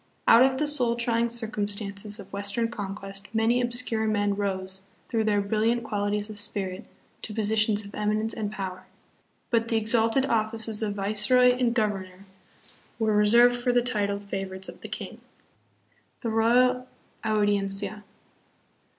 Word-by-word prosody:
Out 230 Hz, -, +7 dB
of 260 Hz, 0 st, +4 dB
the 300 Hz, -, 0 dB
soul 255 Hz, -6 st, +6 dB
trying 235 Hz, 0 st, 0 dB
circumstances 210 Hz, -2 st, -3 dB
of 200 Hz, -, -12 dB
Western 205 Hz, +3 st, 0 dB
conquest 195 Hz, -2 st, -5 dB
many 230 Hz, +3 st, +2 dB
ob 240 Hz, -, 0 dB
scure 230 Hz, -2 st, 0 dB
men 205 Hz, -1 st, 0 dB
rose, 190 Hz, -1 st, -3 dB, 0.3 s
through 225 Hz, -2 st, -1 dB
their 205 Hz, -1 st, +2 dB
brilliant 220 Hz, +4 st, 0 dB
qualities 205 Hz, -1 st, -2 dB
of 215 Hz, -1 st, -6 dB
spirit, 200 Hz, -2 st, -4 dB, 0.4 s
to 210 Hz, -, -6 dB
positions 215 Hz, -1 st, +1 dB
of 200 Hz, -, -12 dB
eminence 215 Hz, +1 st, -1 dB
and 210 Hz, -2 st, -4 dB
power; 185 Hz, -2 st, -6 dB, 0.6 s
but 230 Hz, -1 st, +1 dB
the 230 Hz, -, +1 dB
exalted 225 Hz, +4 st, +2 dB
of 220 Hz, -5 st, +1 dB
fices 225 Hz, -1 st, +1 dB
of 205 Hz, -2 st, -2 dB
viceroy 215 Hz, +5 st, +3 dB
and 245 Hz, -1 st, 0 dB
governor 195 Hz, -4 st, -2 dB, 0.7 s
were 220 Hz, -2 st, +1 dB
reserved 235 Hz, +4 st, +5 dB
for 245 Hz, +1 st, 0 dB
the 245 Hz, 0 st, +2 dB
titled 205 Hz, -4 st, -1 dB
favorites 190 Hz, -1 st, -5 dB
of -, -, -11 dB
the -, -, -8 dB
king. -, -, -7 dB, 1.0 s
The 230 Hz, -, -2 dB
Royal 250 Hz, +3 st, +2 dB, 0.4 s
Audiencia. 205 Hz, -1 st, -1 dB
215 Hz, 150 wpm, -26 LUFS, 200-235 Hz, 1.0 s, Out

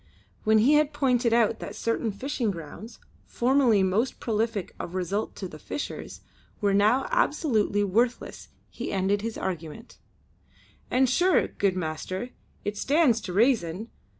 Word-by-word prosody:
When 220 Hz, 0 st, +5 dB
he 240 Hz, +7 st, +5 dB
had 300 Hz, 0 st, +3 dB
pointed 250 Hz, -4 st, +2 dB
out 230 Hz, -1 st, +3 dB
that -, -, -7 dB
certain 230 Hz, -1 st, -1 dB
fishing 240 Hz, +2 st, -2 dB
grounds, 195 Hz, +6 st, -8 dB, 0.3 s
formerly 245 Hz, -5 st, +3 dB
most 205 Hz, +7 st, 0 dB
prolific 220 Hz, -3 st, -2 dB
of 175 Hz, -, -6 dB
result 190 Hz, +4 st, -2 dB
to 190 Hz, -, -5 dB
the 155 Hz, -3 st, -11 dB
fishers, 290 Hz, -, -6 dB, 0.4 s
were 205 Hz, -2 st, +1 dB
now 215 Hz, +6 st, +3 dB
absolutely 275 Hz, -, +1 dB
worthless 235 Hz, +5 st, -1 dB, 0.2 s
he -, -, -5 dB
ended 195 Hz, +1 st, +1 dB
his 225 Hz, +1 st, -4 dB
argument: 175 Hz, +5 st, -6 dB, 0.9 s
"And, 260 Hz, +1 st, +3 dB
sure, 360 Hz, +8 st, +3 dB
good 195 Hz, -2 st, 0 dB
master, 185 Hz, +7 st, -4 dB, 0.3 s
it 205 Hz, 0 st, -3 dB
stands 270 Hz, -2 st, +3 dB
to 180 Hz, -, -6 dB
rayson. 215 Hz, -2 st, +1 dB
220 Hz, 140 wpm, -26 LUFS, 195-250 Hz, 0.9 s, When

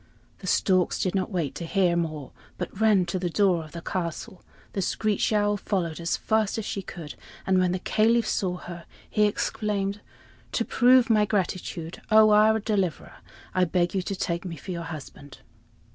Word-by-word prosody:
The -, -, -8 dB
storks 185 Hz, -2 st, +2 dB
did 185 Hz, -, 0 dB
not 190 Hz, -2 st, -1 dB
wait 165 Hz, -9 st, -2 dB
to 150 Hz, -, -6 dB
hear 180 Hz, -1 st, +2 dB
more, 155 Hz, -5 st, -3 dB, 0.3 s
but 185 Hz, +3 st, -6 dB
ran 210 Hz, -5 st, +4 dB
to 175 Hz, +2 st, -2 dB
the 175 Hz, -1 st, -1 dB
door 180 Hz, -2 st, +2 dB
of 155 Hz, -, -14 dB
the 170 Hz, -1 st, -7 dB
castle. 175 Hz, 0 st, -4 dB, 0.3 s
The 195 Hz, -, -1 dB
screech 210 Hz, +3 st, 0 dB
owl 205 Hz, -1 st, +2 dB
followed 175 Hz, -6 st, -2 dB
as 170 Hz, 0 st, -1 dB
fast 220 Hz, -2 st, 0 dB
as 220 Hz, -, -3 dB
she 200 Hz, -, -3 dB
could, 165 Hz, -5 st, -8 dB, 0.3 s
and 190 Hz, -1 st, +3 dB
when 180 Hz, -1 st, +2 dB
the 185 Hz, -, 0 dB
Caliph 225 Hz, +5 st, +2 dB
saw 180 Hz, -2 st, -1 dB
her 175 Hz, -1 st, -9 dB, 0.2 s
he 210 Hz, -, +2 dB
exclaimed: 205 Hz, -1 st, -1 dB, 0.5 s
"To -, -, 0 dB
prove 250 Hz, -1 st, +4 dB
my 210 Hz, -1 st, +4 dB
gratitude, 180 Hz, -4 st, -3 dB
O 215 Hz, 0 st, +6 dB
our 215 Hz, +1 st, +5 dB
deliverer! 195 Hz, -, -2 dB, 0.4 s
I 185 Hz, 0 st, +3 dB
beg 175 Hz, 0 st, 0 dB
you 190 Hz, -, 0 dB
to 195 Hz, +2 st, -4 dB
take 170 Hz, -2 st, -2 dB
me 175 Hz, -3 st, -5 dB
for 165 Hz, -, -8 dB
your 170 Hz, -1 st, -4 dB
husband." 145 Hz, -3 st, -10 dB
185 Hz, 185 wpm, -26 LUFS, 170-210 Hz, 0.5 s, O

